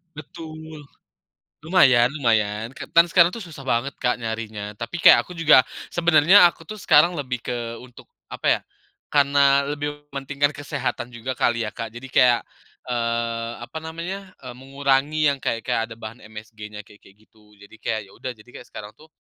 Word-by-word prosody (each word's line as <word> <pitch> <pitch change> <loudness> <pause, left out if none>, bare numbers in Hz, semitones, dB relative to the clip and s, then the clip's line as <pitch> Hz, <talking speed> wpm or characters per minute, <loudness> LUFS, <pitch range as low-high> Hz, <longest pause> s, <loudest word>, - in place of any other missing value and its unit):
Betul! 155 -1 -10 0.8
Lumayan 130 -8 +4
lumayan 110 -3 0
kan - - -9
dan 170 0 +6
sekarang 170 0 +4
tuh 220 0 -8
susah 155 -5 -11
banget 125 +4 0
Kak, 125 -1 +1
nyarinya. 110 -2 -5
Tapi, 115 - -6
kayak, - - +7
aku 180 - -12
juga 155 -5 +6 0.3
sebenarnya, 175 +2 +6
aku 165 - -11
tuh 215 +5 -9
sekarang 165 +2 +5
lebih 130 -6 -4
ke, 120 -1 -4
untuk, 125 -1 -16 0.2
apa - - -6
ya. - - +3 0.5
Karena, 140 -1 +3
lebih 145 0 -5
mementingkan 140 +1 -1
kesehatan 135 -4 -4
juga 120 +2 -5
kali 115 -1 +1
ya, - - -6
Kak. 115 0 -7
Jadi, 125 +3 -10
kayak, 125 -2 +4 0.5
eee, 115 -1 -2
apa 120 - -10
namanya, 170 +5 -7
eee, 125 -2 -9
mengurangi 140 +3 0
yang 140 - +1
kayak-kayak 115 -2 -2
ada - - -8
bahan 110 +2 -9
MSG-nya, 105 -1 -10
kayak-kayak 100 -1 -18
gitu. 105 -1 -25
Jadi, 100 +2 -15
kayak, 110 0 -3
ya - - -19
udah 130 - -5
jadi 110 +1 -20
kayak - - -11
sekarang 105 0 -10
tuh. 155 +1 -20
130 Hz, 170 wpm, -23 LUFS, 115-150 Hz, 0.8 s, kayak